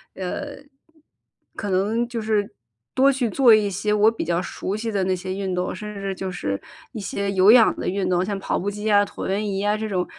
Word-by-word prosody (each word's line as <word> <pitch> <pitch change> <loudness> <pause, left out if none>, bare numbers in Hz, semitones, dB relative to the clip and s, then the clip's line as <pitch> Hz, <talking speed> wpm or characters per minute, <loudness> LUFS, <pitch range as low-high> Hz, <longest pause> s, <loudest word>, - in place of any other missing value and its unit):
呃 235 +10 -5 1.0
可 205 - -4
能 205 +5 +1
就 240 -1 -4
是 215 -2 -1 0.4
多 270 +1 +5
去 255 -4 -1
做 240 +2 +5
一 210 -1 +1
些 200 +2 -1
我 210 +1 +5
比 225 - -4
较 170 +1 0
熟 190 +1 -4
悉 225 +1 -3
的 200 -2 0
那 185 0 +1
些 185 +1 -5
运 195 -1 -3
动， 180 0 -2
甚 210 +2 -7
至 195 -1 -3
就 190 0 -4
是 100 - -3 0.3
一 225 - -5
些 200 0 -3
有 195 +1 +6
氧 230 -2 +6
的 - - -4
运 190 0 -1
动， 180 0 +1
像 200 0 -3
跑 - - -1
步 200 - -2
机 210 +1 -8
呀、 205 -1 +4
椭 - - -6
圆 200 +3 -1
仪 195 -1 -2
呀 205 +1 +1
这 220 0 -3
种， 185 -4 -1
200 Hz, 245 characters per minute, -23 LUFS, 190-215 Hz, 1.0 s, 有